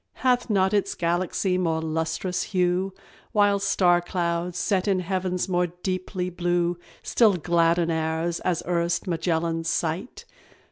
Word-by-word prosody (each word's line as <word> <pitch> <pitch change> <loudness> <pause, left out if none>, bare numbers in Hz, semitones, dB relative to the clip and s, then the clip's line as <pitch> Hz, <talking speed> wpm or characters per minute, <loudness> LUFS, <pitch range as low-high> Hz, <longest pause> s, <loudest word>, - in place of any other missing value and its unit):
Hath 250 -1 +3
not 190 -1 +2
its 200 -1 +1
galaxy 180 +2 0
more 165 -3 0
lustrous 160 +3 -2
hue 180 0 0 0.4
While 205 -1 +4
star 175 -3 +3
clouds, 175 0 -2
set 190 0 0
in 190 -2 +2
heavens 185 0 -1
more 180 -1 +1
deeply 180 +1 -4
blue, 175 0 0 0.2
Still 220 -5 +4
gladden 170 0 +2
ours, 160 +1 -1
as 180 -3 -1
erst 170 +1 0
Magellan's 165 -1 -1
sight? 165 +7 -2
175 Hz, 130 wpm, -25 LUFS, 170-185 Hz, 0.4 s, While